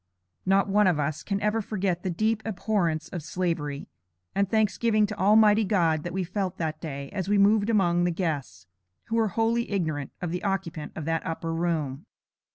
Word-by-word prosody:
Not 195 +1 +4
one 205 0 +4
of 170 -5 +2
us 150 +1 -1
can 200 -1 -2
ever 210 +2 +1
forget 190 -4 -2
the 185 - -2
deep 215 +5 0
abhorrence 180 -6 -1
of 175 - -5
Slavery, 160 -4 -3 0.5
and 200 -1 +1
thanksgiving 215 0 +2
to 210 +1 -5
Almighty 210 +2 +5
God, 170 -6 +2
that 175 - -5
we 190 +1 -1
felt 185 +1 -3
that 155 -1 -3
day 140 -4 -6
as 190 -2 -3
we 205 - +3
moved 205 +2 +4
among 175 -5 +3
the - - +2
guests, 145 - -3 0.4
who 225 - 0
were 225 -1 +3
wholly 230 +1 +1
ignorant 155 -8 -2
of 175 -3 -3
the 180 - -3
occupant 190 -6 -3
of 155 - -5
that 165 0 -1
upper 165 0 -3
room. 165 -1 -2
185 Hz, 185 wpm, -27 LUFS, 165-210 Hz, 0.5 s, Almighty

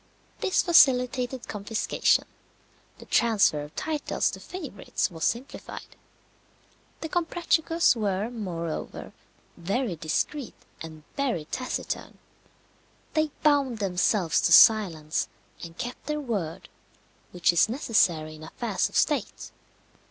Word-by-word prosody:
This 375 - +1
facilitated 255 -6 +3
confiscation; 210 +1 0 0.7
the - - -13
tranfer 210 -10 +3
of 150 - -12
titles 310 -2 -1
to - - -8
favourites 305 - -4
was 160 -2 -7
simplified. 250 +5 -4 1.1
The 320 - -3
Comprachicos 335 -2 +1
were, 210 0 -1
moreover, 170 -8 -5 0.4
very 195 +4 -2
discreet 170 - -2 0.3
and 155 -2 -9
very 250 - -1
taciturn. 255 +10 -4 1.0
They 310 0 +1
bound 285 -5 +3
themselves 185 -2 +1
to - - +1
silence, 175 -9 +5 0.4
and 170 0 -9
kept 245 0 -6
their 300 0 -1
word, 205 - -4 0.6
which 175 -1 +2
is 170 - +4
necessary 180 - +1
in 155 0 -12
affairs 205 +5 -2
of - - -14
state. - - 0
220 Hz, 105 wpm, -26 LUFS, 170-270 Hz, 1.1 s, silence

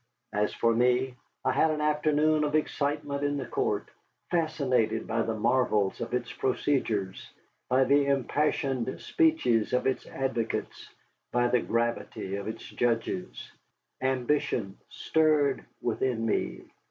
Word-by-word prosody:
As 105 0 +1
for 115 0 +2
me, 125 +2 +2 0.3
I - - +3
had 160 - +3
an 155 -1 -1
afternoon 150 0 +2
of 150 0 0
excitement 145 -1 -1
in 145 0 0
the - - -3
court, 420 0 -1 0.4
fascinated 140 -10 +1
by 115 +1 0
the 115 0 -1
marvels 110 -3 +1
of - - -4
its 125 - -3
procedures, 115 -8 -1 0.4
by 130 +1 +4
the 140 +1 +3
impassioned 135 -2 0
speeches 315 - +2
of 125 - +1
its 130 - -1
advocates, 130 -4 -3 0.4
by 120 0 +2
the 125 -1 +3
gravity 115 -4 -2
of 100 - -6
its 110 - -5
judges. 115 -6 -2 0.5
Ambition 130 -6 0
stirred 155 -3 +2 0.2
within 120 -4 0
me. 115 - -1
130 Hz, 130 wpm, -28 LUFS, 115-150 Hz, 0.5 s, by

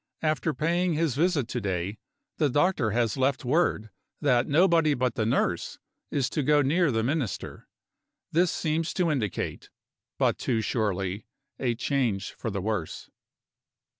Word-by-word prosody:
After 155 +1 +1
paying 170 +3 0
his 160 -3 +1
visit 150 -3 +1
to 125 - -3
day, 95 +1 -3 0.4
the 150 - +2
doctor 145 -3 +2
has 115 +1 0
left 130 0 +1
word 125 - +1 0.3
that 125 -4 +2
nobody 165 -1 +4
but 125 -2 0
the 110 -1 -1
nurse 115 -8 0 0.3
is 135 -3 0
to 150 - 0
go 145 +1 +4
near 165 +5 +2
the 115 -3 0
Minister. 135 -3 -3 0.6
This 175 +2 +3
seems 160 +1 -1
to 175 -4 +2
indicate, 115 -10 -3 0.5
but - - +1
too 115 -4 0
surely, 100 -3 -2 0.3
a 120 -3 0
change 120 -6 -1
for 115 - -5
the 100 -2 -3
worse. 105 -5 -3
130 Hz, 145 wpm, -27 LUFS, 110-155 Hz, 0.6 s, nobody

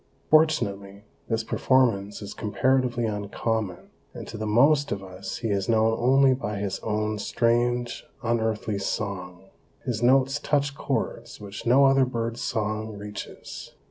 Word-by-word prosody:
Fortunately, 100 -11 +2 0.3
this 115 -1 0
performance 110 -6 +1
is 100 - -7
comparatively 125 +2 +1
uncommon, 105 -1 -3 0.2
and - - -7
to - - -8
the 110 0 -3
most 140 +7 +4
of 100 -1 -3
us 95 0 -7
he 115 - -3
is 100 0 -1
known 110 0 +3
only 130 +2 +5
by 105 -5 -3
his 100 -1 -3
own 105 0 -2
strange, 120 +2 0 0.2
unearthly 110 -3 0
song. 95 -2 -4 0.4
His 120 -3 -2
notes 135 +3 +3
touch 145 -1 0
chords - - -3
which 100 +2 -8
no 135 +4 +6
other 135 -1 +5
bird's 115 -2 -3
song 110 0 -2
reaches. 105 0 -8
110 Hz, 140 wpm, -26 LUFS, 105-125 Hz, 0.4 s, no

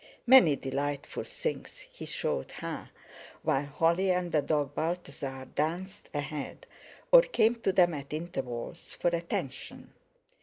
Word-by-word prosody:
Many 240 - +8
delightful 140 +1 -3
things - - -5
he - - -8
showed 65 - -2
her, - - -6 0.5
while 140 +1 +1
Holly 170 +6 +2
and 180 -1 +1
the 150 - +3
dog 145 -1 0
Balthasar 140 -5 -3
danced 175 +5 -2
ahead, 145 -1 -5 0.5
or - - +11
came 240 - +2
to 195 - +2
them 180 -2 +4
at 140 -2 -6
intervals 150 -2 -5
for 175 - +3
attention. 170 -6 -4
160 Hz, 125 wpm, -30 LUFS, 140-180 Hz, 0.5 s, or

